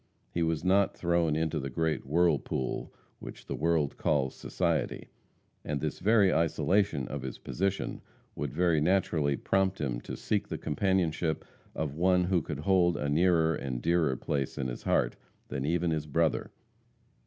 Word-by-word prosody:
He 85 - -1
was 80 -1 0
not 95 +2 +3
thrown 85 -3 +1
into 80 0 0
the 70 0 -4
great 80 +1 -1
whirlpool 75 -4 0 0.3
which - - -10
the - - -4
world 80 -2 0
calls 70 -4 +1
society, - - -2 0.5
and 75 -1 -2
this - - -3
very 100 -1 +4
isolation 80 -1 +1
of - - -5
his 65 -2 -6
position 95 +1 -2 0.3
would 75 -3 -3
very 85 -1 +2
naturally 80 -5 +2
prompt 95 -1 +1
him - - -2
to - - -7
seek - - -1
the - - -4
companionship 85 -2 0 0.3
of 75 -3 -2
one 90 +3 +3
who 90 -1 +2
could 75 -2 -5
hold 85 0 +3
a 70 - -2
nearer 80 +1 +3
and 65 -5 -4
dearer 85 -6 +2
place 70 +1 -2
in 65 -2 -2
his - - -6
heart - - +1 0.3
than 70 - -3
even 85 +1 +1
his 75 -1 -2
brother. 80 +2 +1
80 Hz, 160 wpm, -30 LUFS, 75-90 Hz, 0.5 s, very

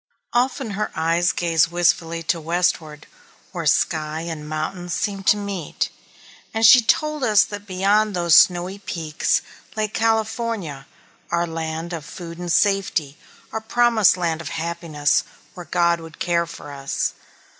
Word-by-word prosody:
Often 250 -1 0
her 210 +2 -2
eyes 165 +2 +2
gazed 165 -1 +2
wistfully 170 -1 +1
to 165 +1 -1
westward, 160 -2 -1 0.5
where - - -3
sky 155 0 +1
and 160 -3 -6
mountains 170 +3 -3
seemed 195 -2 -3
to 210 - +6
meet, 200 -6 -3 0.6
and 225 0 +3
she 250 +3 +9
told 305 +5 +1
us 210 -5 +5
that 205 0 -8
beyond 200 +2 +2
those 170 -2 +2
snowy 180 +4 +5
peaks 165 -5 -1 0.3
lay 215 -1 0
California, 220 - -1 0.4
our 170 0 +1
land 165 +1 -4
of 165 -3 -5
food 170 +2 -9
and 175 -1 -3
safety, 195 -8 +1 0.4
our 220 - -3
promised 225 -3 +3
land 165 -2 -1
of 160 - -6
happiness, 160 -3 0 0.3
where 175 -1 -10
God 170 -1 +2
would 165 -1 -11
care 170 -1 0
for 160 -3 -10
us. 140 -1 -2
175 Hz, 145 wpm, -22 LUFS, 160-205 Hz, 0.6 s, she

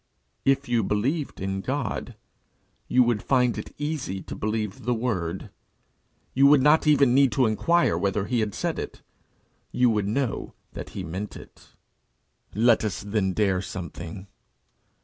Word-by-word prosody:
If 135 +1 +2
you 120 -1 +2
believed 125 - -1
in 95 0 -2
God 130 -1 -3 0.7
you 125 - +4
would 120 -4 +1
find 125 -3 +2
it - - -6
easy 145 -10 -3
to - - -7
believe 105 +1 -3
the 120 +1 0
word. 105 -8 -3 0.8
You 135 +2 +5
would 140 -2 +6
not 150 +2 +4
even 140 -4 +5
need 135 0 +5
to 130 - +3
inquire 170 - +2
whether 100 0 0
he 120 +3 0
had 105 -2 -1
said - - -2
it: - - -7 0.7
you 125 -1 +3
would 105 -2 0
know 125 +2 -2 0.2
that - - -7
he - - -3
meant 95 +6 -5
it. - - -16 0.8
Let 115 +2 +4
us 105 -4 -2
then 100 -2 0
dare 95 -2 +1
something. 90 0 -7
115 Hz, 150 wpm, -25 LUFS, 100-135 Hz, 0.8 s, would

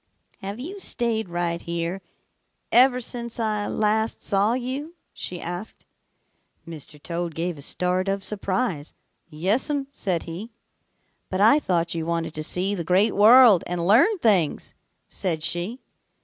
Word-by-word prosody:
"'Have 200 +3 -6
you 365 +10 -7
stayed 230 - -1
right 175 -1 -2
here 170 +2 -3 0.7
ever 250 +1 +5
since 235 -1 -5
I 215 -2 -1
last 220 +1 0
saw 205 +2 +1
you?' 265 +6 -4 0.2
she 180 - -6
asked. 175 +6 -7 0.8
"Mr. 155 -2 -10
Toad 170 +1 -4
gave 170 +1 -2
a - - -9
start 180 +5 -1
of 195 0 -1
surprise. 190 -6 -3 0.3
'Yes'm,' 220 - -1
said 180 - -2
he. 175 +7 -7 0.8
"'But 185 - -2
I 225 +9 +6
thought 170 - -1
you 165 -1 -4
wanted 165 -1 -2
to 155 - -5
see 185 +5 0
the 180 -4 -3
Great 185 +6 +3
World 220 -2 +7
and 175 -1 -2
learn 270 - +5
things,' 200 - +1 0.3
said 165 -5 -2
she. 180 +11 -2
195 Hz, 140 wpm, -24 LUFS, 170-230 Hz, 0.8 s, World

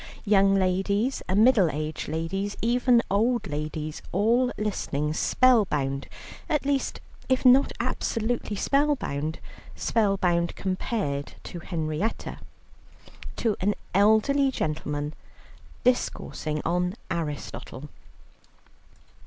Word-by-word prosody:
Young 195 -1 +4
ladies, 195 +6 +1
middle 210 -2 +5
aged 155 +1 -4
ladies, 190 +6 -3
even 240 +1 +3
old 225 +2 +2
ladies, 150 0 -4
all 235 +6 +2
listening 155 -8 -2
spellbound 155 - +2 0.4
at 300 -2 0
least 280 -1 0 0.3
if 260 0 +1
not 260 +2 +6
absolutely 230 -1 -1
spellbound, 230 - 0 0.4
spellbound 190 -6 +1
compared 185 -7 -2
to 175 - -7
Henrietta 160 +4 -3 1.0
to 220 -3 0
an 205 +2 +1 0.2
elderly 220 +8 +4
gentleman 150 - -3 0.7
discoursing 155 -10 -1
on 180 +2 0 0.2
Aristotle. 150 -3 -5
195 Hz, 85 wpm, -26 LUFS, 155-235 Hz, 1.0 s, not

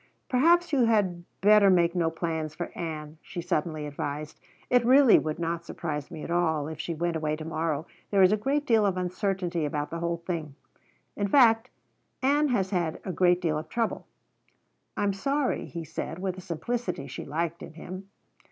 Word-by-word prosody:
"Perhaps 335 +6 +4
you 260 -4 +4
had 190 -6 +1 0.2
better 205 0 +6
make 170 -2 +4
no 170 -3 +1
plans 160 -2 -3
for 175 0 -6
Ann," 155 -2 -6
she 180 - -7
suddenly 155 -2 -2
advised. 145 +1 -5 0.3
"It 245 -1 +4
really 255 0 +7
would 155 0 -3
not 170 0 -2
surprise 150 -4 -5
me 155 - -8
at - - -5
all 160 -4 +1
if 155 -1 -7
she 165 0 -3
went 170 +1 -1
away 155 -1 -1
to 155 0 -8
morrow. 160 -1 -2 0.2
There 195 -2 +4
is 185 - +6
a - - +4
great 275 +7 0
deal 225 -5 +4
of 195 -2 +1
uncertainty 180 -2 -1
about 145 0 -2
the 165 - -3
whole 170 0 -1
thing. 165 -4 -5 0.6
In 205 - -1
fact, 230 0 +5 0.5
Ann 290 +3 +3
has 200 -7 0
had 170 -4 -1
a 185 - -2
great 180 0 +3
deal 155 -3 0
of 155 +1 -9
trouble." 230 +2 -2 0.9
"I'm 205 -1 +1
sorry," 275 +7 -1
he 170 -1 -6
said 160 +1 -5
with 185 0 -3
a 185 - -9
simplicity 190 - -3
she 135 - -7
liked 165 +3 -3
in - - -9
him. 185 +4 -9
175 Hz, 190 wpm, -27 LUFS, 160-205 Hz, 0.9 s, really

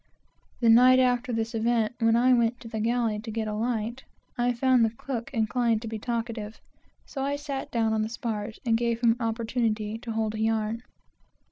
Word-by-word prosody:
The 230 - +4
night 250 +3 +7
after 250 -1 +2
this 225 0 -2
event, 225 0 +1
when 225 -1 +3
I 250 +2 +4
went 235 0 +2
to 230 - -9
the 225 -1 -4
galley 230 -1 0
to 220 +2 -8
get 220 0 -3
a 210 - -3
light, 230 +2 -2 0.3
I 245 0 +1
found 250 0 +3
the 225 - +3
cook 230 +1 -5
inclined 230 -1 +1
to - - -5
be 220 0 -5
talkative, 230 -2 -4 0.5
so 275 - -6
I 280 +1 0
sat 285 -2 -5
down 225 -2 +1
on 220 - +1
the 215 - -2
spars, 220 -2 -4
and 230 -2 +3
gave 235 0 0
him 235 -2 +5
an 240 +2 -3
opportunity 225 -1 -1
to 230 0 -6
hold 220 -1 -1
a 215 - -5
yarn. 220 0 0
230 Hz, 205 wpm, -27 LUFS, 220-245 Hz, 0.5 s, night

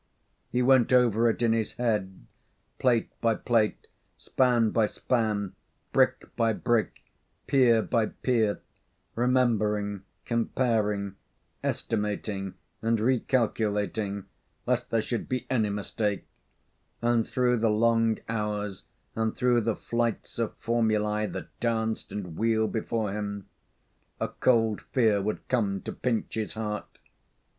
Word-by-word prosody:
He 125 0 +1
went 130 -1 +5
over 120 -2 +4
it 115 - -1
in 115 -1 +4
his 115 -1 -1
head, 105 -6 -2 0.5
plate 120 -3 +2
by 115 -1 +3
plate, 110 -2 +1 0.3
span 120 -4 +2
by 110 -2 +3
span, 105 -5 -1 0.4
brick - - +2
by 115 -1 +2
brick, 115 +1 0 0.4
pier 120 -5 +4
by 115 -2 +1
pier, 110 -5 0 0.5
remembering, 110 -5 +1 0.2
comparing, 110 -4 0 0.5
estimating, 105 -3 -2 0.3
and 115 0 +2
recalculating, 105 -4 0 0.4
lest 125 0 0
there 115 -1 +1
should 120 - -3
be 125 -1 -2
any 110 -5 +2
mistake; 105 0 -2 0.8
and 120 -1 +2
through 125 -1 +2
the 115 0 +2
long 115 +1 +3
hours 105 -3 -3 0.3
and 110 -1 0
through 125 -1 +3
the 115 -1 0
flights 120 0 -2
of 115 - -1
formulae 110 -2 +1
that - - -6
danced 110 -1 -1
and 90 -6 -5
wheeled 110 -1 +2
before 110 -2 -1
him 100 -1 -4 0.7
a - - -1
cold 115 -4 +2
fear 110 -5 +3
would 105 +2 -3
come 105 -6 +1
to - - -4
pinch 120 -4 -2
his 110 -1 -3
heart. 105 -1 -4
110 Hz, 120 wpm, -28 LUFS, 105-120 Hz, 0.8 s, went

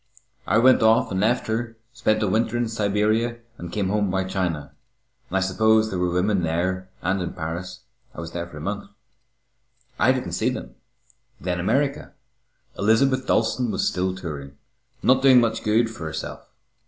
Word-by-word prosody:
I 105 - +3
went 130 +3 +5
off 110 -1 +4
and 95 - -1
left 115 +5 +1
her, 115 +1 -3 0.2
spent 110 -2 +1
a - - +1
winter 110 +4 +1
in 120 -1 0
Siberia, 110 +2 0 0.2
and 85 -1 -7
came 100 -1 -1
home 105 -1 +1
by 95 +1 0
China. 90 -5 -2 0.6
I 95 +1 0
suppose 110 +3 +3
there 95 - -2
were 90 0 +1
women 95 +2 +1
there 90 +3 -1
and 95 +1 0
in 90 - -4
Paris. 85 +3 -5 0.3
I - - -8
was 85 0 -7
there 85 0 -4
for 80 - -12
a - - -7
month. 100 +3 -4 1.1
I - - +5
didn't - - -2
see - - +1
them. - - -6 0.7
Then 90 +1 -2
America. 140 +10 0 0.7
Elizabeth 130 +5 +2
Dalstan 115 +2 +1
was 105 - 0
still 95 0 -1
touring, 75 -6 -7 0.5
not 130 +1 +4
doing 130 -2 +7
much 115 -2 0
good 110 +2 +3
for 110 -7 -8
herself. 80 - -6
100 Hz, 170 wpm, -24 LUFS, 90-115 Hz, 1.1 s, doing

